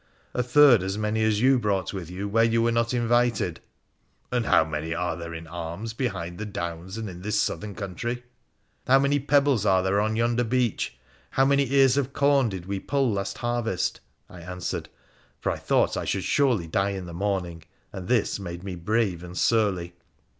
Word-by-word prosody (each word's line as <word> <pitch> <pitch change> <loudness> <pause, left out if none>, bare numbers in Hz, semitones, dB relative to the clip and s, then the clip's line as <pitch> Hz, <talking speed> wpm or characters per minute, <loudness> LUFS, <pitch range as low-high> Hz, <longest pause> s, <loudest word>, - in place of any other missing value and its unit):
' - - -36
A 125 - +1
third 125 -2 +6
as 95 +2 -3
many 110 +1 0
as 110 -1 +2
you 130 0 +5
brought 100 -4 -1
with 90 -4 -6
you 95 +3 -4
where 115 +3 +3
you 115 0 +2
were 115 - +2
not 115 0 +1
invited.' 120 0 +1 0.7
1 125 - 0
And 120 - 0
how - - +5
many 80 +1 -3
are 90 +1 -1
there 85 -1 -7
in 80 0 -7
arms 85 +6 -6
behind 95 -8 -3
the 110 - -3
downs 85 0 -5
and 110 -1 -4
in 90 -2 -8
this 105 +2 0
southern 105 -1 -2
country? 120 +6 -4 0.3
' - - -38
'How 135 - +6
many 140 +1 +2
pebbles 140 -4 +3
are 95 -3 +3
there 100 +2 +2
on 110 +1 0
yonder 120 +1 +1
beach? 120 - -1 0.3
How 135 - +2
many 140 -1 +2
ears 135 -1 +5
of 140 -1 -1
corn 140 -4 +3
did 95 -3 -6
we 100 0 -3
pull 135 +2 0
last 100 +1 -3
harvest? 120 -6 -1 0.2
' - - -46
I 90 - -12
answered, 90 +1 -5 0.5
for - - -1
I - - -3
thought - - +1
I - - -3
should 120 - +1
die 95 +3 +1
in 95 -2 -4
the 85 - -8
morning, 90 -3 -2 0.3
and 95 -2 -7
this 120 -4 +1
made 85 -2 -7
me 95 -2 -5
brave 95 0 0
and 90 +1 -8
surly. 95 -6 +1
105 Hz, 205 wpm, -26 LUFS, 90-120 Hz, 0.7 s, third